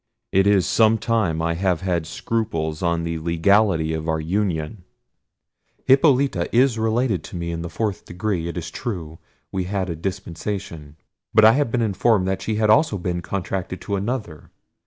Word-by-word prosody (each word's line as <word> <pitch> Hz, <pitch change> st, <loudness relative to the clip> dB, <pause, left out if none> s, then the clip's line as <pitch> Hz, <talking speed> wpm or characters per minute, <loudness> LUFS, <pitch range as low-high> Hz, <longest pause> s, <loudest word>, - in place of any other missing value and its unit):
it 95 Hz, +1 st, +3 dB
is 100 Hz, -3 st, +4 dB
some 110 Hz, 0 st, +4 dB
time 110 Hz, -7 st, 0 dB
that 80 Hz, -, -2 dB
I 85 Hz, 0 st, +1 dB
have 90 Hz, -1 st, 0 dB
had 85 Hz, -4 st, -1 dB
scruples 85 Hz, -7 st, -2 dB
on 85 Hz, -2 st, 0 dB
the 85 Hz, -1 st, -3 dB
legality 85 Hz, 0 st, +2 dB
of 80 Hz, +1 st, -3 dB
our 80 Hz, 0 st, 0 dB
union: 90 Hz, +1 st, -2 dB, 1.0 s
Hippolita 135 Hz, -, +3 dB
is 120 Hz, -1 st, +3 dB
related 110 Hz, -5 st, 0 dB
to -, -, -9 dB
me 85 Hz, -1 st, -3 dB
in 85 Hz, 0 st, -4 dB
the 85 Hz, -, -5 dB
fourth 105 Hz, -1 st, -3 dB
degree—it 90 Hz, -2 st, -3 dB
is 85 Hz, -1 st, -5 dB
true, 85 Hz, -10 st, -5 dB, 0.3 s
we 95 Hz, -2 st, -2 dB
had 95 Hz, -1 st, -2 dB
a -, -, -4 dB
dispensation: 85 Hz, -3 st, -5 dB, 0.4 s
but 110 Hz, 0 st, +7 dB
I 110 Hz, -, +9 dB
have 140 Hz, +1 st, +1 dB
been 120 Hz, -1 st, +1 dB
informed 105 Hz, -1 st, +2 dB
that 95 Hz, -, -2 dB
she 110 Hz, -, -2 dB
had 105 Hz, 0 st, +3 dB
also 130 Hz, -3 st, +3 dB
been 90 Hz, -1 st, -3 dB
contracted 95 Hz, 0 st, -4 dB
to 100 Hz, -, -2 dB
another. 100 Hz, -, -4 dB
95 Hz, 175 wpm, -22 LUFS, 85-110 Hz, 1.0 s, I